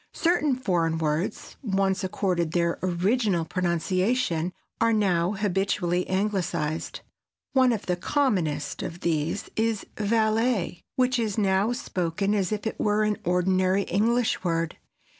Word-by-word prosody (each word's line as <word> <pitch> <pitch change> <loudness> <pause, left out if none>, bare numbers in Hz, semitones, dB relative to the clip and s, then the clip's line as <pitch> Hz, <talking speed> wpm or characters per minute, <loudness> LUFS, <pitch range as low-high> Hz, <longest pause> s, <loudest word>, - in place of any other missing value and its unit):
Certain 330 -5 +2
foreign 170 -9 0
words 160 +5 -2
once 195 -4 0
accorded 180 -3 -1
their 170 -1 +1
original 185 0 +1
pronunciation 185 +1 0 0.3
are 230 0 +3
now 185 -3 +2
habitually 195 -3 0
Anglicized. 185 -5 -1 0.5
One 260 -2 +5
of 220 -4 -2
the 180 - 0
commonest 175 - 0
of 170 +1 -6
these 165 +3 -1
is 225 -2 0
"valet," 220 -3 +1
which 255 -2 +2
is 220 -3 -1
now 200 +1 +2
spoken 195 -4 -1
as 195 -2 0
if 210 0 -3
it 220 - -3
were 210 0 +2
an 210 -1 +1
ordinary 185 +2 +2
English 225 +4 +1
word. 165 -2 -1
190 Hz, 125 wpm, -26 LUFS, 175-220 Hz, 0.5 s, One